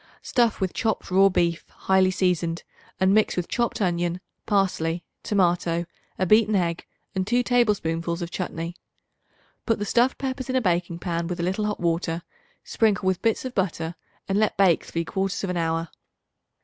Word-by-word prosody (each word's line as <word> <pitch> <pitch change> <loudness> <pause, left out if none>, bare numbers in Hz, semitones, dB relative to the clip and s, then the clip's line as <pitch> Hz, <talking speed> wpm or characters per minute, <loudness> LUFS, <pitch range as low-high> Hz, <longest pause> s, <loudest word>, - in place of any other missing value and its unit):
Stuff 235 -4 +2
with 190 -2 -1
chopped 220 -4 -2
raw 195 +1 +6
beef 170 -2 0
highly 190 -1 +2
seasoned, 175 -3 0 0.4
and 190 +1 +4
mix 215 -2 +3
with 180 - -1
chopped 240 -2 -1
onion, 175 -2 0 0.3
parsley, 180 -5 +1 0.2
tomato, 175 -4 +1 0.3
a 185 - +1
beaten 215 +2 +4
egg 170 -3 -1 0.3
and 190 0 -1
2 245 +2 +2
tablespoonfuls 175 -9 +1
of 170 - -6
chutney. 170 -2 -4 0.9
Put 225 - +2
the 205 - -3
stuffed 240 +5 +2
peppers 260 -1 -4
in 260 - 0
a - - +5
baking 175 -3 0
pan 170 -1 -2
with 180 0 -4
a - - -1
little 190 +4 0
hot 210 - -3
water; 170 0 -1 0.4
sprinkle 210 -4 +1
with 190 -1 +1
bits 225 +2 +1
of 255 - -4
butter 170 -5 -1 0.3
and 195 +1 +1
let 215 - +1
bake 185 -4 +4
three 170 0 -3
quarters 195 +3 -2
of 190 - -1
an 180 - -2
hour. 165 0 -1
185 Hz, 175 wpm, -25 LUFS, 170-210 Hz, 0.9 s, raw